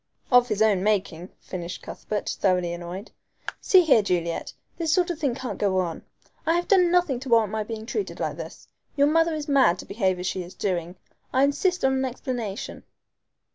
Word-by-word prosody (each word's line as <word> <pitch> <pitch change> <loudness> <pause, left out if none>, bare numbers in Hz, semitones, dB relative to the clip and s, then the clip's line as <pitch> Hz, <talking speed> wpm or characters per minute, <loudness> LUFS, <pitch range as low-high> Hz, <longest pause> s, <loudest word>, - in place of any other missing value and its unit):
"Of 245 0 +6
his 215 -2 +1
own 205 -4 +3
making," 190 -4 -1
finished 175 -1 -6
Cuthbert, 210 -1 -5
thoroughly 180 -3 +1
annoyed. 175 +4 -7 0.5
"See 375 - +6
here, 280 -9 +5
Juliet, 175 -4 -2 0.3
this 325 -2 0
sort 355 0 +2
of 325 - -6
thing 275 -7 0
can't 255 -1 -5
go 195 -2 +1
on. 175 -3 -1 0.4
I 325 +1 +2
have 350 0 -1
done 365 -3 +5
nothing 350 -8 +2
to 265 +1 -8
warrant 225 -3 +4
my 220 0 -1
being 220 0 -6
treated 400 - -4
like - - -2
this. - - -9 0.3
Your 280 - +4
mother 325 +2 +3
is 305 -1 -5
mad 270 - +4
to - - -9
behave 190 -3 0
as 180 - -5
she 185 - -2
is 175 +1 -10
doing. 175 -3 -2 0.4
I 260 +1 +3
insist 355 +4 +1
on 265 - +3
an 265 0 0
explanation." 245 -5 -5
225 Hz, 195 wpm, -25 LUFS, 185-290 Hz, 0.5 s, Of